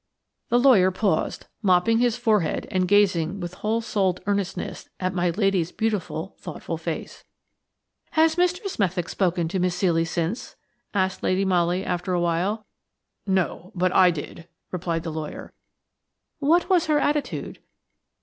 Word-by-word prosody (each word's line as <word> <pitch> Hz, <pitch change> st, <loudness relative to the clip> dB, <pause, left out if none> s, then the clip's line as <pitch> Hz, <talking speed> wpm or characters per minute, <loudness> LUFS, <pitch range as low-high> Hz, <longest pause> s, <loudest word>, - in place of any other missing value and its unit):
The 240 Hz, -, +4 dB
lawyer 240 Hz, -8 st, +6 dB
paused, 190 Hz, -3 st, -1 dB, 0.2 s
mopping 200 Hz, +3 st, +3 dB
his 240 Hz, -1 st, +2 dB
forehead 215 Hz, -8 st, +1 dB
and 185 Hz, -2 st, +1 dB
gazing 195 Hz, -2 st, +3 dB
with 175 Hz, -1 st, -5 dB
whole 220 Hz, +2 st, 0 dB
souled 190 Hz, -5 st, 0 dB
earnestness 200 Hz, -2 st, -3 dB
at 185 Hz, 0 st, -1 dB
my 180 Hz, -1 st, +1 dB
lady's 185 Hz, -2 st, +1 dB
beautiful, 220 Hz, -4 st, -2 dB
thoughtful -, -, -6 dB
face. -, -, -5 dB, 0.9 s
"Has 320 Hz, 0 st, +4 dB
Mr. 360 Hz, +3 st, +1 dB
Smethick 185 Hz, -, -1 dB
spoken 175 Hz, -3 st, 0 dB
to 185 Hz, -, -1 dB
Miss 180 Hz, 0 st, 0 dB
Ceely 165 Hz, -3 st, +2 dB
since?" 170 Hz, +8 st, -3 dB, 0.4 s
asked 190 Hz, -1 st, 0 dB
Lady 190 Hz, +1 st, +1 dB
Molly, 180 Hz, 0 st, +1 dB
after 180 Hz, +1 st, -2 dB
a 175 Hz, -, +2 dB
while. 180 Hz, +6 st, 0 dB, 0.6 s
"No; 190 Hz, -1 st, -1 dB
but 185 Hz, 0 st, +1 dB
I 185 Hz, -1 st, +6 dB
did," 165 Hz, +1 st, -6 dB, 0.2 s
replied 170 Hz, -2 st, -2 dB
the 165 Hz, -, -4 dB
lawyer. 155 Hz, -1 st, -6 dB, 0.9 s
"What 320 Hz, +5 st, +3 dB
was 360 Hz, -5 st, +3 dB
her 305 Hz, -1 st, +3 dB
attitude?" 295 Hz, 0 st, -1 dB
190 Hz, 140 wpm, -24 LUFS, 175-220 Hz, 0.9 s, lawyer